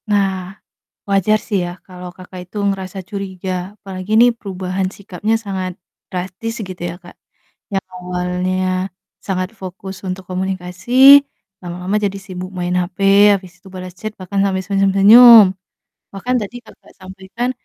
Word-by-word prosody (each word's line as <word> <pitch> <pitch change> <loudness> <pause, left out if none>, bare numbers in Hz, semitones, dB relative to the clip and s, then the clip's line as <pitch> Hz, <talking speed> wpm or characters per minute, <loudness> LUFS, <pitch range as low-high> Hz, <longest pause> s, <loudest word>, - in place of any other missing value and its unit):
Nah, 195 -2 -1 0.5
wajar 200 +2 +3
sih 200 -6 -1
ya 175 +1 -7
kalau 180 -1 -9
Kakak 180 0 -10
itu 210 - -14
ngerasa 195 -1 -2
curiga 190 -1 -5
apalagi 190 0 -7
nih 245 +1 +7
perubahan 190 -2 -3
sikapnya 200 +2 -3
sangat 190 -4 -4 0.4
drastis 190 +6 -5
gitu 185 -3 -7
ya, 175 +1 -5
Kak. 175 0 -15 0.6
Yang 195 -1 -2
awalnya 185 +1 -2 0.3
sangat 185 -1 -2
fokus 190 0 -9
untuk 185 0 -5
komunikasi, 190 +9 +5 0.4
lama-lama 180 +3 -3
jadi 200 -2 -1
sibuk 185 -2 -7
main 180 -1 -2
HP, 180 0 -2 0.4
abis 180 -1 -16
itu - - -14
bales 185 -1 -8
chat 215 +3 -6
bahkan 195 +2 -2
sampai 190 -1 0
senyum-senyum. 200 +2 +7 0.6
Bahkan 225 +6 -2
tadi 210 +3 -6
Kakak - - -18
sampaikan 190 +5 -5
190 Hz, 135 wpm, -18 LUFS, 180-200 Hz, 0.6 s, nih